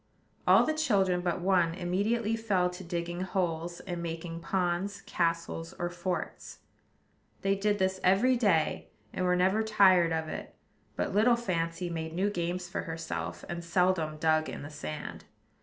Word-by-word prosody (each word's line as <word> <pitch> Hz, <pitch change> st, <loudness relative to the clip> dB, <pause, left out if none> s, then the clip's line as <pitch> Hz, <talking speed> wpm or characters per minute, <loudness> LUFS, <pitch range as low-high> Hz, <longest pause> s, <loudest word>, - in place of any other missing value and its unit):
All -, -, +7 dB
the 310 Hz, -, +1 dB
children 195 Hz, -, +2 dB
but 175 Hz, 0 st, -1 dB
one 175 Hz, -3 st, +2 dB
immediately 205 Hz, +5 st, 0 dB
fell 195 Hz, -6 st, +1 dB
to 180 Hz, +1 st, -8 dB
digging 175 Hz, 0 st, -3 dB
holes, 175 Hz, -2 st, -2 dB
and 175 Hz, -2 st, -5 dB
making 165 Hz, 0 st, -5 dB
ponds, 185 Hz, +3 st, -1 dB
castles, 165 Hz, -1 st, -2 dB
or 175 Hz, 0 st, -2 dB
forts. 175 Hz, +1 st, -4 dB, 0.9 s
They 195 Hz, -, +3 dB
did 205 Hz, +1 st, +1 dB
this 190 Hz, -1 st, 0 dB
every 205 Hz, +8 st, +4 dB
day, 200 Hz, -10 st, +1 dB, 0.2 s
and 185 Hz, -, -1 dB
were 180 Hz, 0 st, +3 dB
never 190 Hz, +4 st, +3 dB
tired 190 Hz, -6 st, +5 dB
of 160 Hz, -1 st, -1 dB
it; -, -, -7 dB, 0.4 s
but -, -, -2 dB
little 225 Hz, +4 st, +5 dB
Fancy 175 Hz, -6 st, -2 dB
made 160 Hz, -1 st, -4 dB
new 200 Hz, +3 st, +1 dB
games 175 Hz, -1 st, -2 dB
for 175 Hz, -, -3 dB
herself, 90 Hz, -, -5 dB
and 170 Hz, 0 st, -5 dB
seldom 170 Hz, -3 st, +1 dB
dug 155 Hz, 0 st, +2 dB
in -, -, -6 dB
the 145 Hz, -, -8 dB
sand. 150 Hz, +1 st, -6 dB
180 Hz, 155 wpm, -30 LUFS, 165-195 Hz, 0.9 s, All